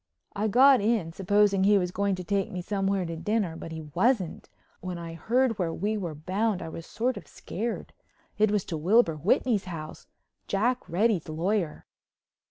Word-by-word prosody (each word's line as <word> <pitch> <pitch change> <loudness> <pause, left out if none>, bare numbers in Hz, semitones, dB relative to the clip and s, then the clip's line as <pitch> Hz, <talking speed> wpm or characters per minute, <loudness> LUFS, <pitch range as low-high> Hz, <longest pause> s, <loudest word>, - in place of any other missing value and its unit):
I 210 +2 0
got 260 +3 +6
in, 205 -6 0
supposing 200 +1 +3
he 205 +1 +5
was 180 -2 0
going 200 +1 0
to 180 - -6
take 195 +1 -1
me 185 - -4
somewhere 195 -1 0
to 165 0 -4
dinner, 195 0 -1
but 165 - -8
he 160 0 -5
wasn't. 225 - +1 0.3
When 180 -1 -5
I 165 -1 -7
heard 230 +6 +1
where 170 -3 0
we 205 +6 -1
were 175 -7 -4
bound 190 +6 -1
I - - -6
was 165 +1 -8
sort 245 +3 -1
of - - -10
scared—it 215 0 -4
was 205 -2 0
to 160 - -4
Wilbur 175 0 +3
Whitney's 205 - +1
house, 160 -4 -8 0.4
Jack 240 +6 0
Reddy's 195 -1 +1
lawyer. 170 +1 -1
195 Hz, 175 wpm, -27 LUFS, 170-215 Hz, 0.4 s, got